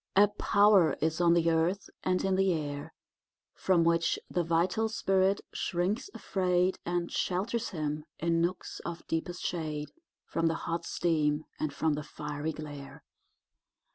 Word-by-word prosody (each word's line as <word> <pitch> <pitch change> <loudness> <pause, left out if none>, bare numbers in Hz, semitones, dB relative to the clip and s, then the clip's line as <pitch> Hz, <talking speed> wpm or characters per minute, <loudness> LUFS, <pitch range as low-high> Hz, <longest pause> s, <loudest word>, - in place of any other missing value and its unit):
A 205 +1 +7
power 205 -4 +4
is 160 +2 0
on 170 -1 +5
the 165 -1 +3
earth 175 +5 +1 0.2
and 185 0 +1
in 190 -1 +2
the 190 0 +3
air 145 -3 -3 0.6
From 180 -3 +2
which 170 0 +2
the 175 - +1
vital 175 +7 +1
spirit 195 -2 +2
shrinks 185 - -1
afraid, 180 -1 +1
And 175 0 -1
shelters 225 +6 -1
him, 150 -4 -3
in 165 +1 +1
nooks 175 +2 -2
of 170 0 -6
deepest 170 +2 -3
shade, 155 -3 -3 0.3
From 165 - 0
the 165 - +1
hot 170 0 -2
steam 155 -3 +1
and 155 - -1
from 155 +2 0
the 150 - -2
fiery 150 +1 -4
glare. 145 -2 -9
170 Hz, 145 wpm, -30 LUFS, 155-185 Hz, 0.6 s, A